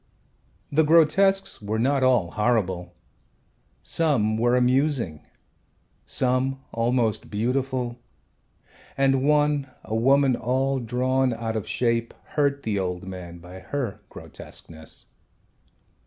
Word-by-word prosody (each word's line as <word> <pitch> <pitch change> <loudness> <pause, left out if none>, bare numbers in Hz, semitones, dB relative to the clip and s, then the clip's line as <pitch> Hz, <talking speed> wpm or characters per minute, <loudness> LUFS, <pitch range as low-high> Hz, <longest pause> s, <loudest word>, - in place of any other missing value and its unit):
The 155 +2 +4
grotesques 170 - +3
were 105 +1 -2
not 135 +4 +2
all 125 -10 +3
horrible. 95 -6 0 0.9
Some 130 -10 +1
were 120 +2 +2
amusing, 125 - +1 0.8
some 130 +1 0
almost 115 -1 0
beautiful, 125 +2 -1 1.0
and 135 -1 +3
one, 145 -1 +2
a - - -6
woman 135 +3 +4
all 130 +3 0
drawn 125 +1 0
out 115 -1 -3
of 110 - -3
shape, 115 -1 0
hurt 140 -1 0
the 105 -3 -1
old 90 -1 -3
man 90 -2 -8
by 90 +2 -11
her 125 0 -4
grotesqueness. 80 -1 -9
125 Hz, 105 wpm, -25 LUFS, 110-135 Hz, 1.0 s, The